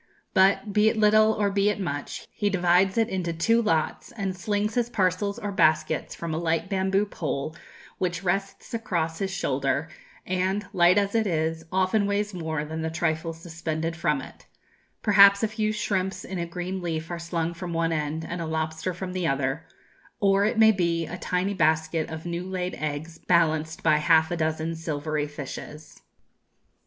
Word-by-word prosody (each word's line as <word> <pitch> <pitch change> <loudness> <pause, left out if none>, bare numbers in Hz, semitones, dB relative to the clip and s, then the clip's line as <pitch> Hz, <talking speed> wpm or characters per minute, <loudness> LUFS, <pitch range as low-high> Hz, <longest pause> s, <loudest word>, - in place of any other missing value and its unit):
But, 195 +2 +3
be 210 +1 +5
it 220 - -2
little 215 +1 +5
or 205 -2 0
be 200 +1 +2
it 210 - -2
much, 145 -7 -4
he 205 - 0
divides 185 +1 +3
it 225 -1 +3
into 175 -3 -2
two 230 +8 +2
lots, 165 -8 -1
and 195 -5 -3
slings 205 +3 -1
his 240 0 0
parcels 200 -1 0
or 210 -4 -4
baskets 155 -4 +1
from 165 -1 -4
a 160 - -1
light 165 +2 -1
bamboo 195 +1 +1
pole 155 -5 -4 0.4
which 180 0 -1
rests 195 +4 -2
across 170 -8 -2
his 195 - -1
shoulder, 140 -3 -1 0.4
and, 185 +2 -1
light 175 +1 +5
as 200 -1 +1
it 225 -2 +2
is, 160 -1 -1
often 190 +2 +2
weighs 205 +1 -1
more 160 -4 -3
than 160 +1 -5
the 160 - -1
trifles 160 0 -2
suspended 165 -1 -3
from 150 -4 0
it; - - -14 0.6
perhaps 200 0 +7
a - - +4
few 215 0 -1
shrimps 190 -3 -2
in 190 -1 -5
a 170 - -2
green 180 +2 -4
leaf 165 -1 -3
are 170 - -3
slung 170 0 -2
from 175 +1 -6
one 165 0 0
end, 155 0 -2
and 175 0 -4
a 165 - -3
lobster 160 +2 -2
from 185 0 -5
the 180 -2 -1
other, 135 +3 -1 0.5
or, 195 0 +3
it 220 +2 0
may 220 0 +7
be, 170 -4 0
a 160 +3 -6
tiny 180 +3 -1
basket 160 -2 +1
of 160 0 -7
new 170 0 -3
laid 180 -1 -2
eggs 155 +2 -4
balanced 160 -2 +2
by 155 -2 +4
half 160 +1 +4
a - - 0
dozen 160 0 -1
silvery 155 -2 -2
fishes. 150 +1 -9
175 Hz, 180 wpm, -26 LUFS, 160-195 Hz, 0.6 s, perhaps